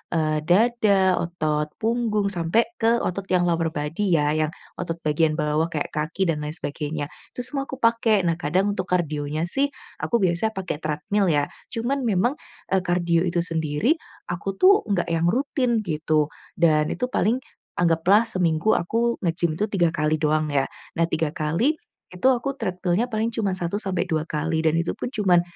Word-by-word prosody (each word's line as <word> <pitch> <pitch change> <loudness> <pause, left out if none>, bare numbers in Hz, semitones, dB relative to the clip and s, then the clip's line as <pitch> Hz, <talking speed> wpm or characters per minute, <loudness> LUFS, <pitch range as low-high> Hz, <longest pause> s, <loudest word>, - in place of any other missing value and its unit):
eee, 155 -1 +1
dada, 200 -2 +3
otot 155 -3 -1
punggung, 220 -3 0
sampai 175 +5 +2 0.2
ke 230 +1 +4
otot 195 +2 -3
yang 180 -2 +2
lower 170 -1 +1
body 150 +7 -2
ya 150 -1 +2
yang, 155 0 0 0.3
otot 165 - -2
bagian 155 0 +2
bawah 150 +1 +1
kayak 155 -3 -3
kaki 160 +5 -1
dan 165 -5 0
lain 150 +1 -4
sebagainya, 150 -1 -4 0.2
itu 250 - -3
semua 275 +2 -2
aku - - -5
pakai, 230 -5 +2
nah 170 -1 0
kadang 185 +6 +1
untuk 185 -2 -3
kardionya 155 -4 -1
sih, 270 +12 +1 0.3
aku - - -1
biasanya 175 +3 +2
pakai 185 -5 -3
treadmill 155 +7 -1
ya, 145 -4 +3 0.3
cuman 255 +4 -1
memang, 220 +3 +2 0.4
eee, 190 0 +3
kardio 175 -1 +2
itu 175 -1 +1
sendiri, 165 - 0 0.3
aku 175 +3 -3
tuh 395 +3 +6
nggak 195 -6 0
yang 165 0 +1
rutin 245 - +1
gitu, 155 -4 0 0.2
dan 155 -2 +3
itu 250 0 -2
paling, 245 +1 +1 0.3
anggaplah 175 +5 +4
seminggu 180 -3 +1
aku 230 +7 +1
ngegim 170 -2 0
tuh 210 - +1
3 185 -5 +2
kali 155 -1 +1
doang 155 0 +2
ya, 140 -1 +3 0.3
nah 170 - +2
3 160 -2 -1
kali, 165 - +1 0.4
itu 180 +7 +1
aku 260 +2 -1
treadmill-nya 185 +1 -1
paling 220 +1 0
cuma 215 -4 0
1-2 175 -3 -1
kali 160 +1 -1
dan 160 0 +2
itu 170 - -1
pun - - -4
cuman, 190 -7 +3
175 Hz, 170 wpm, -24 LUFS, 155-215 Hz, 0.4 s, tuh